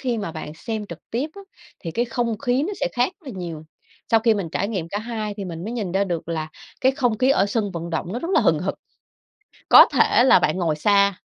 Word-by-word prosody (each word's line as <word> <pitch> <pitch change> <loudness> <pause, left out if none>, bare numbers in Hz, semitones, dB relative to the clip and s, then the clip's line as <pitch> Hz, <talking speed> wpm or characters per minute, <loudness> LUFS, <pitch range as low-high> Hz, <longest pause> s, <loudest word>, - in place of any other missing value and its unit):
khi 245 -4 -1
mà 200 -6 -4
bạn 155 -1 -7
xem 220 +3 -5
trực 170 -4 -9
tiếp 270 +7 -2
á 400 - -10 0.4
thì 165 - -5
cái 235 +8 0
không 230 -2 -2
khí 260 +1 +1
nó 395 +6 -2
sẽ - - +1
khác 245 +9 +1
rất 325 - -24
là 190 - -8
nhiều. 165 -3 -6 0.5
Sau 225 - +5
khi 225 0 +3
mình 195 -5 -3
trải 200 - -1
nghiệm 185 -7 -3
cả 205 - -3
hai 215 -2 -4
thì 200 - -5
mình 170 -2 -6
mới 225 - -4
nhìn 205 -7 -3
ra 195 +1 +2
được 170 -3 -4
là 160 -2 -3 0.3
cái 260 +1 +4
không 245 -5 0
khí 260 +1 +3
ở 200 -7 +3
sân 205 0 -1
vận 170 0 -5
động 170 +3 -3
nó 240 - -2
rất 335 +6 -4
là - - +5
hừng - - +3
hực. - - -2 1.0
Có - - +10
thể 240 - +4
là 265 - +6
bạn - - 0
ngồi 165 -4 0
xa 200 +5 +3
210 Hz, 260 wpm, -22 LUFS, 175-240 Hz, 1.0 s, Có